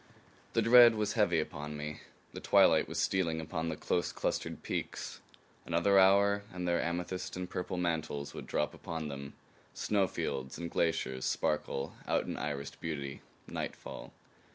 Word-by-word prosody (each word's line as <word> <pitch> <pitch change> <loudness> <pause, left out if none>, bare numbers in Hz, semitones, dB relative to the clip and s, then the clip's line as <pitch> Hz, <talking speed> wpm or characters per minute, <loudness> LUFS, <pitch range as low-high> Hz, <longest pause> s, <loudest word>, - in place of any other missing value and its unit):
The 115 - +3
dread 120 0 +8
was 105 -1 0
heavy 100 -8 +3
upon 75 -1 -4
me. 75 +1 -5 0.3
The - - -6
twilight - - +5
was - - -5
stealing 85 -4 +1
upon 80 +1 -3
the 80 - -2
close 85 +3 -1
clustered - - -2
peaks. - - -4 0.4
Another 85 +4 +3
hour, 100 +1 +5
and 90 -1 -4
their 85 -1 +2
amethyst 90 +2 -3
and 90 0 -3
purple 90 +1 -4
mantles 80 -5 -2
would - - -8
drop 75 - 0
upon 80 -2 -5
them; 70 0 -7 0.4
snowfields 75 -9 -1
and 85 -1 -5
glaciers 80 -6 0
sparkle 70 -2 -1
out - - +1
in - - -3
irised 70 -1 -4
beauty; 70 -4 -4 0.3
nightfall. - - -6
85 Hz, 150 wpm, -32 LUFS, 75-95 Hz, 0.4 s, dread